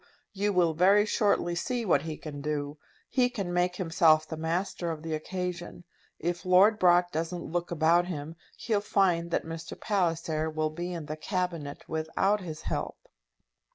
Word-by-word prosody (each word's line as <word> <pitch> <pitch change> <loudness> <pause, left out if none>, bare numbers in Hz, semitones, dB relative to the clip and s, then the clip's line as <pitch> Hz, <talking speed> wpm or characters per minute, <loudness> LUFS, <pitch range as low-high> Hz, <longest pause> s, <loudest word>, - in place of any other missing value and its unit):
You 205 +1 0
will 175 -4 +3
very 195 +6 +5
shortly 200 -5 +1
see 235 +7 -2
what 155 -7 +3
he 160 0 -5
can 145 -2 -7
do. 145 0 -3 0.3
He 250 -2 +2
can 200 -8 -4
make 180 0 +1
himself 160 -3 +3
the 160 - -5
master 170 +2 -2
of 160 -1 -5
the 160 -1 -3
occasion. 175 +2 -4 0.3
If 175 +1 -3
Lord 195 +4 +5
Brock 175 0 +4
doesn't 165 +2 -3
look 175 0 -1
about 170 +1 +3
him, 160 -2 -5 0.2
he'll 215 -3 0
find 180 -5 +1
that - - -1
Mr. 165 0 -7
Palliser 165 -6 0
will 155 0 -1
be 175 +3 -4
in 170 -3 -5
the 155 +1 -5
Cabinet 170 -4 -3
without 160 +6 0
his 160 -4 -7
help." - - -3
175 Hz, 165 wpm, -29 LUFS, 160-185 Hz, 0.3 s, very